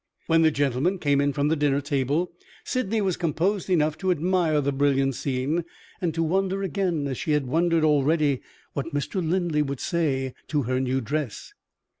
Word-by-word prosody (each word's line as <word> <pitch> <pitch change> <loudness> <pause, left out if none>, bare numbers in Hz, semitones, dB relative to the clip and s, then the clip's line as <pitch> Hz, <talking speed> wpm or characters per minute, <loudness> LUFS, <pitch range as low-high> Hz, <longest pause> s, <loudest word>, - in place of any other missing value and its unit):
When 165 0 +3
the 160 - +6
gentlemen 145 +5 0
came 145 -4 +2
in 145 0 +2
from 145 +1 0
the 160 - +2
dinner 145 -2 +2
table, 145 +4 0 0.3
Sydney 225 -4 -1
was 190 -3 0
composed 180 +4 0
enough 155 -4 +2
to 190 - -1
admire 175 -2 +2
the 140 0 0
brilliant 135 -1 +2
scene, 140 +6 -1 0.4
and 175 -3 +1
to 165 - +1
wonder 190 +3 0
again, 185 -6 -1
as 135 -3 -3
she 155 - 0
had 150 -2 +1
wondered 165 +4 +2
already, 150 -2 +2 0.3
what 145 +2 -4
Mr. 175 +6 -1
Linley 165 -2 +1
would 140 -3 -3
say 140 -8 -1
to 150 -3 0
her 130 +2 0
new 130 0 0
dress. 140 0 -4
150 Hz, 180 wpm, -25 LUFS, 140-175 Hz, 0.4 s, the